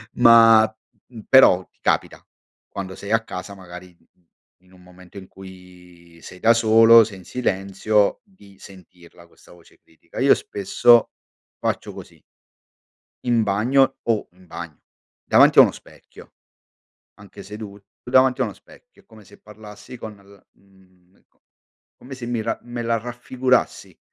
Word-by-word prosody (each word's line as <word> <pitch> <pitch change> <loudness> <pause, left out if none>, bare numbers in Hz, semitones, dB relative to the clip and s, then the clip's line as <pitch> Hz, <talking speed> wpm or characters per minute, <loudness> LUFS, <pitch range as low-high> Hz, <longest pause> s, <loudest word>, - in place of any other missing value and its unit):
Ma, 115 -2 +6 0.5
mh, 120 -3 -13
però 115 -9 +5
ti - - -42
capita, - - -2 0.5
quando 95 -1 -8
sei 100 - -9
a 115 0 +1
casa, 100 -1 -9
magari 90 -1 -13
in 85 - -34 0.6
in 90 0 -26
un 90 - -20
momento 90 +1 -15
in 95 - -15
cui 90 -3 -17
sei 90 - -13
da 115 - +3
solo, 115 0 +5
sei 105 -2 -9
in 95 - -16
silenzio, 100 - -1
di 100 - -22
sentirla, 90 -3 -18
questa - - -23
voce 85 -1 -21
critica. 80 - -20
Io - - +4
spesso 115 +4 +1 0.5
faccio - - -4
così. - - -14 1.1
In 120 -2 +1
bagno 125 +7 +1
o 110 -3 -2
in 90 +1 -22
bagno, 85 -3 -11 0.4
davanti - - +3
a - - +11
uno - - +3
specchio, - - -18 0.8
anche 100 -2 -15
sedut 105 -1 -11 0.2
davanti 130 +1 +2
a - - +1
uno - - -7
specchio, - - -22
come 110 -1 -18
se 100 +1 -20
parlassi 105 +3 -14
con 110 -2 -9
l 100 0 -22
mhmm, 95 -1 -29
co - - -44 0.6
come 130 +2 -12
se 125 -2 -9
mi 120 -2 -3
ra 115 +1 -4
me 120 0 -7
la 115 0 -1
raffigurassi, 125 +2 -3
100 Hz, 150 wpm, -20 LUFS, 90-115 Hz, 1.1 s, a